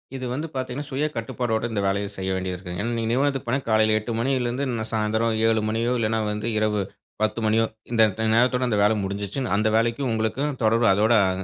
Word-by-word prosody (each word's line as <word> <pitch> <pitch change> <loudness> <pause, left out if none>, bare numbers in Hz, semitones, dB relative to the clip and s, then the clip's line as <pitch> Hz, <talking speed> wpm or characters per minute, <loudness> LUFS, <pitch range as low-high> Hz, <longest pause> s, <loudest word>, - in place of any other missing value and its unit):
இது 130 - -4
வந்து 150 +5 -3
பார்த்தீங்கன்னா, 130 +2 -4
சுய 140 +3 -1
கட்டுப்பாடோட 115 0 -2
இந்த 105 -2 -1
வேலைய 100 +1 0
செய்ய 95 0 -3
வேண்டியது 95 -1 -3
இருக்கு. 90 0 -7
ஏன்னா, 115 +3 -2
நீங்க 115 -1 -1
நிறுவனத்துக்கு 135 +1 0
போனா, 130 +4 +1
காலையில 110 0 +4
8:00 110 +2 -6
மணியிலேருந்து 130 +1 0
ந 110 - -2
சாயந்தரம் 110 +1 0
7:00 110 -1 +2
மணியோ, 115 +3 0
இல்லனா 110 0 0
வந்து 105 +2 -3
இரவு 105 -1 +1 0.4
10:00 110 +1 0
மணியோ, 110 +1 +3 0.3
இந்த 115 -2 +3 0.2
ட 110 - -3
நேரத்தோடு 125 +1 +3
அந்த 105 -4 +1
வேலை 105 +1 +4
முடிஞ்சுச்சு. 100 +4 -3 0.2
அந்த 105 +1 +2
வேலைக்கும் 120 +3 0
உங்களுக்கும் 130 +6 -1
தொடர்பு 115 +1 +3
அதோட 110 +4 +3
அ - - +1
115 Hz, 200 wpm, -24 LUFS, 110-125 Hz, 0.4 s, காலையில